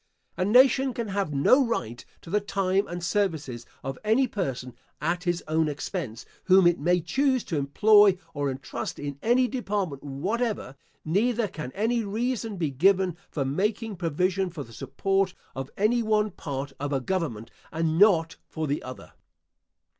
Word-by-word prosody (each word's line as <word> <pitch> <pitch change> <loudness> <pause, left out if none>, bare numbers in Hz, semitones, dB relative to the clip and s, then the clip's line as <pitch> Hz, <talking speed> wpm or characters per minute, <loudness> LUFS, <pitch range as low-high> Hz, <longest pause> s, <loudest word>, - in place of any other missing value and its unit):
A - - 0
nation 255 +4 +4
can 230 -3 -3
have 195 -5 -1
no 145 - +4
right 120 - -3 0.2
to 165 - -11
the 210 - +3
time 195 -1 0
and 175 0 -6
services 160 - -1 0.2
of 135 0 -5
any 225 +5 +3
person 130 - -4 0.3
at 175 +4 -1
his 175 -1 0
own 155 0 +1
expense, 145 - -5 0.2
whom 190 -1 +6
it 175 0 +4
may 175 +4 +2
choose 260 - +1
to 165 - -3
employ 205 +7 +5 0.2
or 145 -2 -1
entrust 135 +1 -5
in 145 -1 -6
any 250 +3 +3
department 200 - -3
whatever; 185 - -2 0.3
neither 220 +7 +1
can 155 -8 -7
any 225 +3 0
reason 225 0 -2
be 160 -5 -1
given 185 +4 +3
for 140 -3 -2
making 210 - -1
provision 180 +2 0
for 160 -4 -6
the 115 - -15
support 195 - -1 0.2
of 135 +1 -5
any 225 +4 +2
one 215 -1 +1
part 140 -4 -5
of 145 +1 -3
a 135 - +1
government 125 - -3 0.2
and 160 0 0
not 175 -6 +4
for 160 -1 -4
the 145 0 -1
other. 130 0 -10
180 Hz, 160 wpm, -26 LUFS, 145-210 Hz, 0.3 s, whom